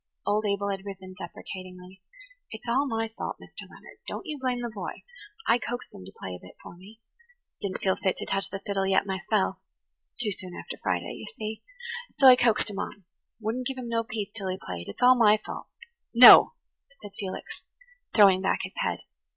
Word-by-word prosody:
Old 210 Hz, +1 st, +1 dB
Abel 200 Hz, 0 st, 0 dB
had 195 Hz, -1 st, -4 dB
risen 190 Hz, -2 st, -8 dB
deprecatingly. 185 Hz, +1 st, -9 dB, 0.5 s
"It's 220 Hz, +2 st, -10 dB
all 265 Hz, +5 st, +2 dB
my 225 Hz, -2 st, -1 dB
fault, -, -, -4 dB
Mr. -, -, -11 dB
Leonard. -, -, -15 dB
Don't -, -, -5 dB
you 300 Hz, -2 st, -5 dB
blame 250 Hz, -2 st, -1 dB
the 240 Hz, -1 st, -4 dB
boy. 205 Hz, -, -6 dB, 0.4 s
I 235 Hz, -, +4 dB
coaxed 245 Hz, +1 st, -5 dB
him 95 Hz, -, -11 dB
to 95 Hz, -, -11 dB
play 95 Hz, -, -6 dB
a 90 Hz, -, -8 dB
bit 90 Hz, -, -15 dB
for -, -, -10 dB
me. 200 Hz, +5 st, -15 dB
I 475 Hz, -, -35 dB
didn't 195 Hz, -2 st, -4 dB
feel 190 Hz, -1 st, +3 dB
fit 190 Hz, -2 st, 0 dB
to -, -, -4 dB
touch 195 Hz, 0 st, -1 dB
the 195 Hz, -, -6 dB
fiddle 195 Hz, -1 st, 0 dB
yet 190 Hz, 0 st, +3 dB
myself–too 195 Hz, +3 st, -3 dB
soon 185 Hz, -2 st, -5 dB
after -, -, -8 dB
Friday, -, -, -1 dB
you -, -, -8 dB
see. 215 Hz, 0 st, -5 dB, 0.6 s
So 275 Hz, -, +5 dB
I 255 Hz, -1 st, +11 dB
coaxed 235 Hz, -3 st, +2 dB
him 200 Hz, -, -5 dB
on–wouldn't 220 Hz, +5 st, -6 dB
give 270 Hz, -, -4 dB
him 245 Hz, -2 st, -6 dB
no 230 Hz, 0 st, 0 dB
peace 215 Hz, -3 st, -5 dB
till 200 Hz, -4 st, -5 dB
he 185 Hz, -, -2 dB
played. 85 Hz, -, -7 dB
It's 100 Hz, -, -5 dB
all 250 Hz, +1 st, +9 dB
my 215 Hz, -3 st, +6 dB
fault." -, -, -8 dB, 0.5 s
"No," 245 Hz, -, +10 dB, 0.5 s
said 205 Hz, -, -10 dB
Felix, 190 Hz, -3 st, -6 dB, 0.5 s
throwing 195 Hz, -3 st, +6 dB
back 190 Hz, -, +1 dB
his -, -, -6 dB
head. -, -, -1 dB
205 Hz, 195 wpm, -27 LUFS, 190-235 Hz, 0.6 s, I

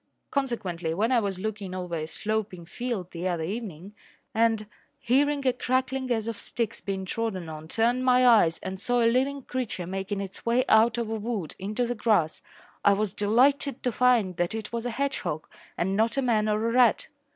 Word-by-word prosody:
Consequently, 185 Hz, -, -2 dB
when 220 Hz, +6 st, +1 dB
I 250 Hz, -, +5 dB
was 200 Hz, -4 st, -2 dB
looking 200 Hz, -2 st, -4 dB
over 180 Hz, -2 st, -5 dB
a 155 Hz, -1 st, -3 dB
sloping 210 Hz, -2 st, -3 dB
field 220 Hz, -2 st, -4 dB
the 175 Hz, +2 st, -3 dB
other 170 Hz, -3 st, -1 dB
evening 195 Hz, -1 st, -5 dB, 0.4 s
and, 225 Hz, -1 st, +2 dB, 0.3 s
hearing 280 Hz, +3 st, +1 dB
a 255 Hz, -, +4 dB
crackling 260 Hz, +1 st, -1 dB
as 225 Hz, -2 st, 0 dB
of 230 Hz, -2 st, -4 dB
sticks 230 Hz, -2 st, -3 dB
being 195 Hz, -1 st, -3 dB
trodden 190 Hz, -4 st, -3 dB
on, 155 Hz, 0 st, -8 dB
turned 235 Hz, +7 st, +1 dB
my 255 Hz, 0 st, +5 dB
eyes 205 Hz, -9 st, +5 dB
and 190 Hz, 0 st, -5 dB
saw 245 Hz, +1 st, +2 dB
a -, -, +3 dB
living 270 Hz, +2 st, 0 dB
creature 245 Hz, -9 st, -3 dB
making 195 Hz, +2 st, -3 dB
its 195 Hz, -1 st, -7 dB
way 240 Hz, +2 st, +2 dB
out 225 Hz, +2 st, +5 dB
of 235 Hz, -2 st, -1 dB
a -, -, 0 dB
wood 210 Hz, -7 st, -3 dB
into 210 Hz, +6 st, -1 dB
the 240 Hz, -, -1 dB
grass, 210 Hz, -8 st, +1 dB, 0.4 s
I 200 Hz, -, +6 dB
was 205 Hz, -1 st, -1 dB
delighted 260 Hz, +6 st, +2 dB
to 250 Hz, -, +1 dB
find 230 Hz, -7 st, +3 dB
that 175 Hz, +4 st, 0 dB
it 220 Hz, 0 st, -6 dB
was 235 Hz, +1 st, -2 dB
a -, -, -1 dB
hedgehog 255 Hz, -, -2 dB, 0.3 s
and 190 Hz, +3 st, 0 dB
not 225 Hz, +5 st, +1 dB
a 275 Hz, -, +2 dB
man 215 Hz, -3 st, +2 dB
or 215 Hz, +2 st, +1 dB
a -, -, 0 dB
rat. 245 Hz, -2 st, +4 dB
220 Hz, 195 wpm, -27 LUFS, 190-245 Hz, 0.4 s, I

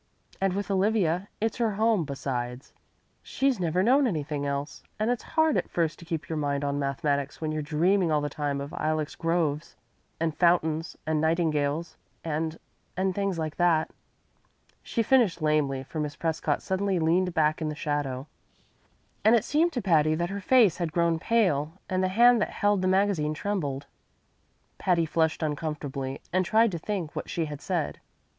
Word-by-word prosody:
And 195 Hz, -1 st, +2 dB
with 200 Hz, +1 st, -3 dB
Olivia 195 Hz, -2 st, +1 dB
it's 225 Hz, 0 st, -1 dB
her 230 Hz, -3 st, +1 dB
home, 215 Hz, -4 st, +2 dB
besides. 130 Hz, -2 st, -4 dB, 0.5 s
She's 270 Hz, -5 st, 0 dB
never 180 Hz, +1 st, +1 dB
known 265 Hz, +5 st, +4 dB
anything 150 Hz, -6 st, -2 dB
else. 140 Hz, +1 st, -4 dB, 0.2 s
And 215 Hz, +3 st, +1 dB
it's 245 Hz, -, -1 dB, 0.2 s
hard 315 Hz, -2 st, +4 dB
at -, -, -2 dB
first 165 Hz, -3 st, -1 dB
to 170 Hz, -, -12 dB
keep 165 Hz, -2 st, -4 dB
your 160 Hz, -1 st, -3 dB
mind 145 Hz, -1 st, -1 dB
on 140 Hz, 0 st, -1 dB
mathematics 140 Hz, 0 st, -1 dB
when 155 Hz, -1 st, -2 dB
you're 155 Hz, 0 st, -2 dB
dreaming 165 Hz, +4 st, +2 dB
all 150 Hz, -, +3 dB
the 145 Hz, -, -2 dB
time 145 Hz, -1 st, -2 dB
of 140 Hz, +2 st, -7 dB
ilex 155 Hz, -1 st, -1 dB
groves 165 Hz, -2 st, -1 dB, 0.4 s
and 160 Hz, -1 st, -1 dB
fountains 165 Hz, -2 st, +1 dB
and 155 Hz, -1 st, 0 dB
nightingales 160 Hz, -1 st, 0 dB, 0.3 s
and 160 Hz, 0 st, -2 dB, 0.4 s
and 190 Hz, 0 st, +1 dB
things 200 Hz, -2 st, -1 dB
like 155 Hz, -1 st, -3 dB
that." 170 Hz, -3 st, +2 dB, 0.9 s
She 230 Hz, -, -1 dB
finished 235 Hz, -8 st, +3 dB
lamely, 150 Hz, -4 st, +1 dB
for 155 Hz, +4 st, -6 dB
Miss 150 Hz, -1 st, -3 dB
Prescott 160 Hz, -2 st, -1 dB
suddenly 190 Hz, 0 st, 0 dB
leaned 175 Hz, +2 st, +1 dB
back 155 Hz, 0 st, +2 dB
in 155 Hz, -, -1 dB
the 150 Hz, -, -4 dB
shadow, 145 Hz, -3 st, -2 dB, 1.0 s
and 220 Hz, +3 st, +6 dB
it 230 Hz, -1 st, +1 dB
seemed 325 Hz, +4 st, +2 dB
to 245 Hz, -, -2 dB
Patty 155 Hz, -4 st, +3 dB
that 170 Hz, +3 st, -2 dB
her 200 Hz, 0 st, -4 dB
face 220 Hz, -4 st, +4 dB
had 170 Hz, -3 st, -2 dB
grown 170 Hz, 0 st, +1 dB
pale 165 Hz, -9 st, +1 dB
and 185 Hz, -1 st, 0 dB
the -, -, +3 dB
hand 235 Hz, +4 st, +5 dB
that -, -, 0 dB
held 205 Hz, -2 st, +1 dB
the 185 Hz, -, +1 dB
magazine 185 Hz, -6 st, +1 dB
trembled. 145 Hz, -8 st, -2 dB, 0.9 s
Patty 175 Hz, -3 st, +2 dB
flushed 160 Hz, +1 st, 0 dB
uncomfortably 145 Hz, -3 st, -3 dB
and 185 Hz, 0 st, +3 dB
tried 220 Hz, +4 st, +3 dB
to 170 Hz, -, -4 dB
think 180 Hz, -3 st, -4 dB
what -, -, -5 dB
she 165 Hz, -, -1 dB
had 150 Hz, -1 st, -7 dB
said. 175 Hz, -6 st, -2 dB
165 Hz, 175 wpm, -27 LUFS, 150-195 Hz, 1.0 s, and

